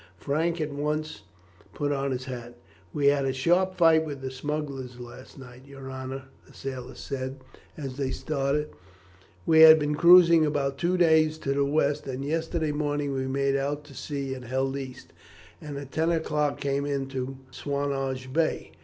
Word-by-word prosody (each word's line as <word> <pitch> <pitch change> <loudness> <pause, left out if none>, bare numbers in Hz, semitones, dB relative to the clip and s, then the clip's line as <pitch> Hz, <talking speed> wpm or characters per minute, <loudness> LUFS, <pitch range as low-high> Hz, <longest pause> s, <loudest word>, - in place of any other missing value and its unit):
Frank 165 +4 -1
at 155 -1 -2
once 150 -1 -3 0.5
put 145 -1 -1
on 140 -1 -1
his 130 -1 -3
hat. 120 -2 -7 0.4
"We 145 -1 -1
had 140 0 +4
a 135 -1 0
sharp 180 +7 +2
fight 165 -2 +5
with 145 -3 -6
the 130 0 -4
smugglers 135 -2 -5
last 125 +3 -11
night, 130 0 -13
your 135 -1 -9
honour," 130 0 -6 0.2
the - - -18
sailor 130 -1 -6
said 135 -1 -5 0.4
as 135 -4 -6
they 135 -2 -1
started. 145 +1 -1 0.7
"We 160 -1 +5
had 160 0 +10
been 150 -1 0
cruising 170 0 +7
about 145 -2 0
for 135 - -19
two 180 +2 +1
days 160 -2 +4
to 140 -3 -2
the 140 0 +1
west, 145 0 0
and 135 +1 -4
yesterday 160 0 -1
morning 145 -1 -1
we 130 -1 -2
made 140 +1 0
out 145 +2 -2
to 145 -1 -15
sea 140 -1 -4
and 130 -2 -8
held 135 +2 -1
east, 130 -2 -8 0.5
and 145 -2 -6
at 140 -1 -8
ten 160 +2 +1
o'clock 150 -3 0
came 140 0 -1
into 135 -2 -3
Swanage 135 -2 -3
Bay. 160 +1 0
140 Hz, 175 wpm, -27 LUFS, 135-155 Hz, 0.7 s, had